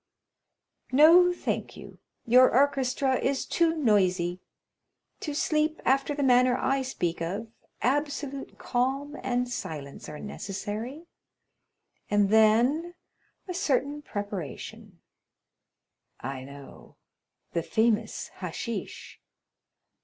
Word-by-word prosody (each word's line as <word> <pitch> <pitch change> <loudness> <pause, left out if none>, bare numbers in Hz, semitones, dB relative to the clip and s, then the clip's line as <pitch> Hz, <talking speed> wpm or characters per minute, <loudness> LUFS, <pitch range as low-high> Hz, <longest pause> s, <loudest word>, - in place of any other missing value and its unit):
"No, 330 +6 +7
thank 355 - -3
you. - - -12 0.3
Your 250 +2 +6
orchestra 265 -1 +2
is 270 0 0
too 335 -1 +2
noisy. 185 - +2 0.8
To 300 -3 -4
sleep 310 +1 +1
after 275 +2 +2
the 285 - -1
manner 250 -1 +4
I 270 0 +1
speak 175 -11 -3
of, 200 +7 -4 0.3
absolute 280 +1 -2
calm 270 +4 -1
and 250 -1 0
silence 150 - -6
are 150 - -7
necessary, 210 - -6 1.0
and 205 -1 +2
then 240 +11 +3 0.5
a 365 - -4
certain 295 -5 0
preparation——" 205 - -7 1.2
"I 130 0 -6
know—the 140 +4 -10
famous 220 +3 0
hashish!" 190 +5 -6
250 Hz, 95 wpm, -27 LUFS, 205-285 Hz, 1.2 s, No